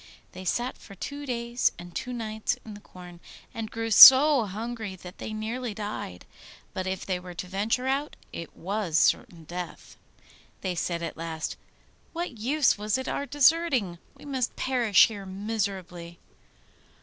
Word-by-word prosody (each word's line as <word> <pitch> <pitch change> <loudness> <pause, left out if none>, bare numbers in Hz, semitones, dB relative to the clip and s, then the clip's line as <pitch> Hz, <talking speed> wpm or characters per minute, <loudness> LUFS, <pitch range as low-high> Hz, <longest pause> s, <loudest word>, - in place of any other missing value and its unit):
They 185 - -9
sat 240 +7 -1
for 195 - -13
two 285 +8 -6
days 235 0 0
and 175 0 -11
two 250 - -4
nights 220 0 -2
in 220 - -8
the 205 - -10
corn, 180 -3 -13 0.3
and 225 -2 -5
grew 225 0 -4
so 265 +3 +10
hungry 220 0 -5
that 180 +1 -12
they - - -5
nearly 220 +1 -4
died; 205 - -6 0.5
but 185 0 -3
if 190 0 -3
they 185 -2 -1
were 180 -1 -10
to 175 - -5
venture 210 +7 -1
out, 275 +3 -1 0.2
it 170 - -8
was 190 -3 -1
certain 165 0 +1
death. 175 +2 -8 0.6
They 185 -2 -2
said 170 0 -2
at 165 - -5
last, 160 -1 -4 0.6
'What 335 -9 -5
use 265 0 +2
was 210 +3 0
it 260 - -5
our 285 - -2
deserting? 280 - +2 0.2
We - - -15
must 260 -4 -2
perish 240 -6 +4
here 205 -3 -6
miserably. 190 -4 -4
215 Hz, 160 wpm, -27 LUFS, 180-250 Hz, 0.6 s, so